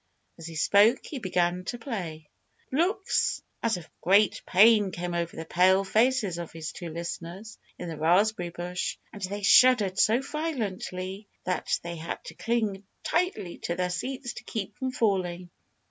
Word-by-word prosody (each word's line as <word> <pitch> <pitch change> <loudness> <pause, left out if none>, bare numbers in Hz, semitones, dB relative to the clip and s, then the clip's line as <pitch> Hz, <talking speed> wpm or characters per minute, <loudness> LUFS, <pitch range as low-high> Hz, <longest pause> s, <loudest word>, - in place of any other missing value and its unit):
As 165 - -7
he 165 - -8
spoke 205 - +4
he 285 - -6
began 180 -3 0
to 240 - -3
play. 180 - -5 0.4
Looks 360 +8 +1 0.2
as 225 -4 +1
of 170 -2 -10
great 200 +3 +4
pain 210 +1 +6
came 175 -1 -4
over 170 -1 -2
the 160 - -6
pale 185 +3 +4
faces 215 -3 +2
of 170 - -6
his 165 0 -6
two 175 -2 -7
listeners 170 +5 -6 0.2
in 175 - -6
the 165 -2 -5
raspberry 180 +3 +2
bush. 175 +1 -4 0.2
And 205 - -9
they 200 +2 -4
shuddered 210 -4 +6
so 225 +3 +4
violently 205 - -4 0.2
that 180 0 0
they 170 0 -5
had 160 +1 -5
to - - -8
cling 220 -4 -1 0.2
tightly 355 - -1
to 170 - -3
their 180 0 -1
seats 250 +7 -4
to 220 - -9
keep 210 -3 -5
from 260 +2 -3
falling. 180 -6 -1
190 Hz, 160 wpm, -27 LUFS, 175-225 Hz, 0.4 s, pain